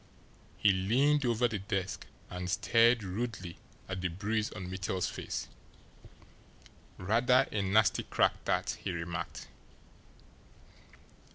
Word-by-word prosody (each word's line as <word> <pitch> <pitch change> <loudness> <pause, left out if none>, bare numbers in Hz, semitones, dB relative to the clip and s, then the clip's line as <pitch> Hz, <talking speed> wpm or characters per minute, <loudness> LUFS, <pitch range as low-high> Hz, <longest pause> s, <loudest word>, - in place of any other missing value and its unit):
He 105 - +5
leaned 130 +9 +2
over 120 +1 +2
the 110 -3 -3
desk 95 -1 -3 0.2
and 90 0 -5
stared 115 +3 +4
rudely 95 -2 -4 0.3
at 95 -1 -4
the 95 - +1
bruise 105 +5 -1
on 95 -1 -6
Mittel's 95 0 -2
face. - - -5 1.5
"Rather 120 +7 +3
a 105 - 0
nasty 100 +2 +3
crack, - - +1
that," - - 0
he - - -2
remarked. 85 0 -5
100 Hz, 110 wpm, -31 LUFS, 95-115 Hz, 1.5 s, He